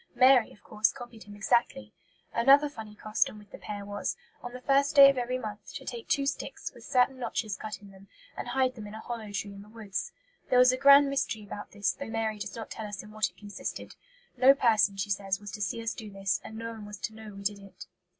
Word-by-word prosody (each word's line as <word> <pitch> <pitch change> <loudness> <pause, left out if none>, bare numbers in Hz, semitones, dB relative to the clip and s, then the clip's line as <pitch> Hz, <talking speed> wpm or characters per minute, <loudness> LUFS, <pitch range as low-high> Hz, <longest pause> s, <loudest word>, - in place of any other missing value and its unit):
Mary, 255 -1 +6
of - - -19
course, 215 0 +1
copied 240 -4 -11
him 205 0 -11
exactly. 205 - 0 0.4
Another 275 +5 +6
funny 220 -6 -10
custom 215 0 0
with 210 -1 -16
the - - -10
pair 205 -1 -6
was, 205 - -3 0.2
on 245 - -7
the 250 - -8
first 275 +2 +2
day 275 -1 +10
of - - -7
every 250 +1 -1
month, 215 -4 -7
to - - -7
take 235 -2 -6
two 280 - +1
sticks, 275 - -4
with - - -14
certain 255 +1 +2
notches 225 -3 -2
cut 215 +1 -7
in 200 - -13
them, 195 0 -16 0.3
and - - -5
hide 260 -1 +1
them 215 -4 -9
in 210 - -9
a - - -7
hollow 225 -3 -6
tree 205 0 -4
in 200 - -10
the 205 - -15
woods. 215 -3 -5 0.4
There 250 - +4
was 250 0 +7
a - - +1
grand 280 +1 +8
mystery 245 -5 -1
about 205 0 -8
this, 205 0 +1
though 280 -4 -7
Mary 220 -1 -2
does 200 0 -5
not 225 -1 -7
tell 220 - -5
us 205 -1 -6
in 210 - -13
what 215 -1 0
it - - -30
consisted. 205 +2 -7 0.4
"No 260 +2 +7
person," 215 -6 +3
she 195 +1 -2
says, 195 0 -1
"was 205 -1 -8
to 210 - -7
see 205 +4 -2
us 225 - -1
do 220 -4 -8
this, 195 -1 -1
and 220 0 -9
no 230 0 -5
one 220 -2 -9
was 210 0 -8
to 220 - -4
know 215 -2 -10
we 200 - -9
did 200 0 -1
it." 195 -1 -12
220 Hz, 250 wpm, -29 LUFS, 205-250 Hz, 0.4 s, day